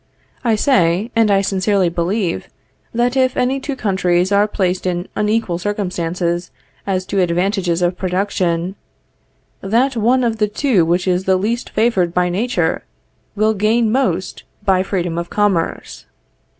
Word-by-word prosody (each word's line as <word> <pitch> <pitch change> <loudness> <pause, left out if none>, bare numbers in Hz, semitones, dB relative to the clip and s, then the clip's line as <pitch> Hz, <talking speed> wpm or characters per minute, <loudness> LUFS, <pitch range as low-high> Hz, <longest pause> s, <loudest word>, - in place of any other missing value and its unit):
I 230 -3 +2
say, 205 - +2
and 225 -2 +4
I 195 -1 +4
sincerely 195 -1 +1
believe, 175 +2 -2 0.4
that 240 +2 0
if 260 -1 +2
any 255 +2 +1
two 275 +1 -4
countries 190 -4 +1
are 205 +1 +4
placed 185 -3 -1
in 175 0 -2
unequal 210 -4 0
circumstances 180 -3 -2 0.4
as 185 -1 -1
to 195 - -1
advantages 180 0 0
of 175 +1 0
production, 185 -2 -1 0.9
that 240 +7 +1
one 245 +3 +2
of 230 -2 0
the 210 -1 +2
two 210 - +1
which 175 +3 0
is 185 +1 +1
the 190 -1 +3
least 225 +6 -2
favored 195 -7 +1
by 180 0 +2
nature, 225 +8 -1 0.5
will 215 +1 +2
gain 215 +2 +2
most 190 -8 -1 0.2
by 190 -2 +3
freedom 175 -3 -2
of 170 - -5
commerce. 200 -5 -1
195 Hz, 145 wpm, -18 LUFS, 180-220 Hz, 0.9 s, and